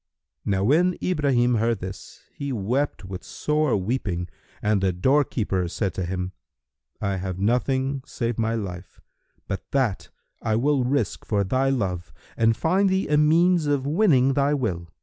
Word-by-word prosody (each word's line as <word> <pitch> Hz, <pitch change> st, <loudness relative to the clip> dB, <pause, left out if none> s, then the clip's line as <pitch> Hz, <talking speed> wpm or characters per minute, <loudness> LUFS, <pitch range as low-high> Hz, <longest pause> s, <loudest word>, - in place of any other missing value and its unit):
Now 95 Hz, -1 st, +1 dB
when 170 Hz, -, +3 dB
Ibrahim 130 Hz, -8 st, +2 dB
heard 115 Hz, 0 st, +1 dB
this, 95 Hz, 0 st, -9 dB
he 140 Hz, -1 st, -4 dB
wept 125 Hz, +1 st, -1 dB
with 90 Hz, -1 st, -7 dB
sore 150 Hz, -5 st, 0 dB
weeping 95 Hz, -4 st, -2 dB, 0.3 s
and 105 Hz, -2 st, +1 dB
the 95 Hz, -1 st, +2 dB
doorkeeper 105 Hz, -3 st, +1 dB
said 95 Hz, +1 st, -2 dB
to 90 Hz, +1 st, -3 dB
him, 90 Hz, 0 st, -3 dB, 0.7 s
"I 100 Hz, -1 st, -1 dB
have 95 Hz, -1 st, -4 dB
nothing 130 Hz, +6 st, 0 dB
save 120 Hz, -2 st, -3 dB
my 115 Hz, 0 st, +1 dB
life; 95 Hz, -4 st, -6 dB, 0.5 s
but 95 Hz, -, -5 dB
that 130 Hz, -8 st, 0 dB, 0.3 s
I 110 Hz, -1 st, 0 dB
will 135 Hz, +3 st, +2 dB
risk 125 Hz, -5 st, -1 dB
for 105 Hz, -2 st, 0 dB
thy 130 Hz, +7 st, +1 dB
love 95 Hz, -9 st, -2 dB, 0.2 s
and 115 Hz, 0 st, +2 dB
find 190 Hz, +4 st, +2 dB
thee 190 Hz, -3 st, 0 dB
a 150 Hz, -, +3 dB
means 165 Hz, +2 st, +4 dB
of 140 Hz, -2 st, +1 dB
winning 145 Hz, -5 st, +3 dB
thy 140 Hz, +1 st, +2 dB
will." 90 Hz, -, -2 dB
120 Hz, 155 wpm, -24 LUFS, 95-140 Hz, 0.7 s, means